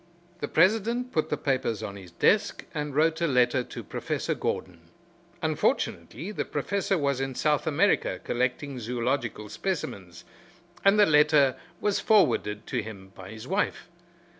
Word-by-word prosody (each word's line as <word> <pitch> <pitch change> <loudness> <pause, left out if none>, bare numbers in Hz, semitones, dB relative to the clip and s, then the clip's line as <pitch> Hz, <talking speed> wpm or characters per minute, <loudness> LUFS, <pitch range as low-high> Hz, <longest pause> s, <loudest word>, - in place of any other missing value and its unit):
The 145 - -3
president 225 - +2
put 155 - 0
the - - 0
papers 130 -6 -1
on 100 -2 -5
his 95 -3 -11
desk 85 - +1
and 150 -2 -3
wrote 160 +2 +2
a 170 - +3
letter 125 -2 +3
to - - -8
Professor - - -2
Gordon. - - -4 0.5
Unfortunately 120 - -1
the - - -2
Professor 200 -1 -1
was 140 -3 0
in 135 -1 -3
South 150 +3 +1
America 160 - +2
collecting 125 +2 -2
zoological 120 -1 -2
specimens, 100 - -4 0.6
and 195 +1 +5
the 205 - +8
letter 150 -3 +5 0.2
was 205 -1 +1
forwarded 110 - +2
to 125 - -2
him 100 -3 -10
by 95 -1 -11
his 110 +3 -9
wife. 195 +4 -1
140 Hz, 145 wpm, -27 LUFS, 110-165 Hz, 0.6 s, the